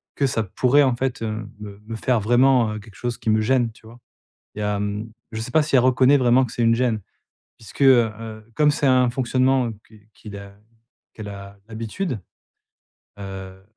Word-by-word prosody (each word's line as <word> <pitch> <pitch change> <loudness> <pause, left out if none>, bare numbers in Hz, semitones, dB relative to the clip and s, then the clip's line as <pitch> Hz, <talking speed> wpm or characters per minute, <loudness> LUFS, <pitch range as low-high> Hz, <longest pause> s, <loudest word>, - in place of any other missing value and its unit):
que 140 - +1
ça 115 -4 0
pourrait 125 +8 +2
en 130 -3 +2
fait, 130 0 -3
heu, 110 -1 -4
me 100 -1 -9
me 115 - -6
faire 120 +1 +1
vraiment, 120 0 +3
heu, 105 - -5
quelque 105 -1 -15
chose 120 -1 -4
qui 110 - -3
me 110 - +3
gêne, 120 0 +1
tu 110 0 -21
vois? 120 +2 -14 0.6
Il - - -7
y - - -3
a, 105 -1 -1
mmh 105 +2 -4 0.2
je 110 - -4
sais 120 - -6
pas 160 - +4
si 150 -2 0
elle 125 - +6
reconnaît 130 +2 +4
vraiment 125 0 +4
que 120 - -10
c'est 120 - -1
une 115 - +4
gêne. 115 -3 0 0.6
Puisque, 110 +5 -8
heu, 125 -4 +6 0.5
comme 150 -1 +4
c'est 145 - -1
un 130 -2 +4
fonctionnement, 130 +1 +1
heu, 115 - -6
qui 110 -1 -20
qu'il 105 -2 -11
a 100 0 -11 0.6
qu'elle 105 -2 -8
a 100 0 -10
l'habitude, 115 - -4 1.0
heu, 95 -1 -8
115 Hz, 205 wpm, -22 LUFS, 105-130 Hz, 1.0 s, elle